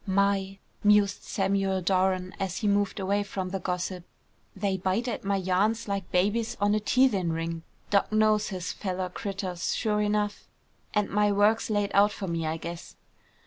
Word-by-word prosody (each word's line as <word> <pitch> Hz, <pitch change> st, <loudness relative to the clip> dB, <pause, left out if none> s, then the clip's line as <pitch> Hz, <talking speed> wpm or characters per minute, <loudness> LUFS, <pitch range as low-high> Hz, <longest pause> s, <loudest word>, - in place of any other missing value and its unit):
"My!" 195 Hz, 0 st, +1 dB, 0.3 s
mused 205 Hz, -1 st, +4 dB
Samuel 195 Hz, -1 st, 0 dB
Doran 185 Hz, 0 st, +1 dB
as 190 Hz, -1 st, -2 dB
he 215 Hz, -, -1 dB
moved 205 Hz, 0 st, +1 dB
away 200 Hz, +2 st, +1 dB
from 195 Hz, -2 st, -4 dB
the 195 Hz, +1 st, -3 dB
gossip. 180 Hz, 0 st, -3 dB, 0.5 s
"They 200 Hz, -2 st, 0 dB
bite 190 Hz, +6 st, -1 dB
at 240 Hz, -, -3 dB
my 200 Hz, 0 st, 0 dB
yarns 195 Hz, +5 st, +1 dB
like 200 Hz, -2 st, -3 dB
babies 220 Hz, +6 st, +1 dB
on 205 Hz, 0 st, +2 dB
a 215 Hz, -, +2 dB
teethin' 210 Hz, -6 st, +2 dB
ring. 165 Hz, 0 st, -3 dB, 0.3 s
Doc. 200 Hz, 0 st, +2 dB
knows 215 Hz, -1 st, +3 dB
his 180 Hz, -3 st, -4 dB
fellow 185 Hz, -2 st, -3 dB
critters, 190 Hz, -2 st, -3 dB
sure 210 Hz, -2 st, 0 dB
enough, 210 Hz, 0 st, -1 dB, 0.5 s
and 210 Hz, -1 st, +2 dB
my 210 Hz, 0 st, +3 dB
work's 210 Hz, +3 st, +3 dB
laid 205 Hz, -2 st, 0 dB
out 205 Hz, +1 st, +5 dB
for 200 Hz, -1 st, -5 dB
me, 165 Hz, -2 st, -2 dB
I 160 Hz, +1 st, -1 dB
guess." 170 Hz, +1 st, -8 dB
200 Hz, 170 wpm, -27 LUFS, 185-210 Hz, 0.5 s, out